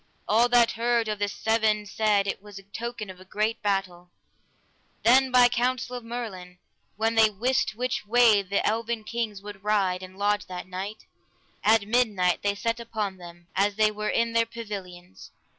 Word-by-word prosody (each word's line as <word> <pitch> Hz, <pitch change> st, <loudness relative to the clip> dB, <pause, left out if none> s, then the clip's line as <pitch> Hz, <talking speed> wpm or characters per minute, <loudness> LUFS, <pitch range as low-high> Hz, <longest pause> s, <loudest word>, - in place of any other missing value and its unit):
All 230 Hz, +3 st, +4 dB
that 240 Hz, -1 st, +5 dB
heard 235 Hz, 0 st, 0 dB
of 210 Hz, -1 st, -3 dB
the 205 Hz, -, +1 dB
sweven 220 Hz, 0 st, 0 dB
said 205 Hz, -1 st, +1 dB
it 195 Hz, -, -3 dB
was 205 Hz, -1 st, -12 dB
a 195 Hz, -, -10 dB
token 220 Hz, 0 st, -6 dB
of 185 Hz, 0 st, -15 dB
great 215 Hz, +2 st, -1 dB
battle. 190 Hz, -4 st, -2 dB, 0.9 s
Then 260 Hz, +3 st, +5 dB
by 250 Hz, -1 st, +6 dB
counsel 250 Hz, +1 st, -1 dB
of 245 Hz, -, -6 dB
Merlin, 210 Hz, -7 st, -7 dB, 0.4 s
when 225 Hz, +2 st, 0 dB
they 220 Hz, -1 st, +5 dB
wist 235 Hz, +3 st, 0 dB
which 250 Hz, +2 st, -2 dB
way 230 Hz, -2 st, +5 dB
the 200 Hz, +1 st, -1 dB
eleven 230 Hz, 0 st, -1 dB
kings 215 Hz, -3 st, -4 dB
would 205 Hz, -1 st, -10 dB
ride 195 Hz, -3 st, +1 dB
and 185 Hz, 0 st, -11 dB
lodge 205 Hz, +1 st, 0 dB
that 180 Hz, 0 st, -7 dB
night, 195 Hz, +3 st, -6 dB, 0.6 s
at 215 Hz, -1 st, +4 dB
midnight 210 Hz, -7 st, +2 dB
they 200 Hz, 0 st, 0 dB
set 230 Hz, +3 st, -2 dB
upon 215 Hz, -4 st, -4 dB
them, 175 Hz, -1 st, -13 dB
as 200 Hz, +1 st, +2 dB
they 215 Hz, 0 st, +3 dB
were 210 Hz, 0 st, -3 dB
in 230 Hz, 0 st, +1 dB
their 230 Hz, 0 st, +2 dB
pavilions. 195 Hz, -6 st, -9 dB
215 Hz, 175 wpm, -26 LUFS, 195-230 Hz, 0.9 s, by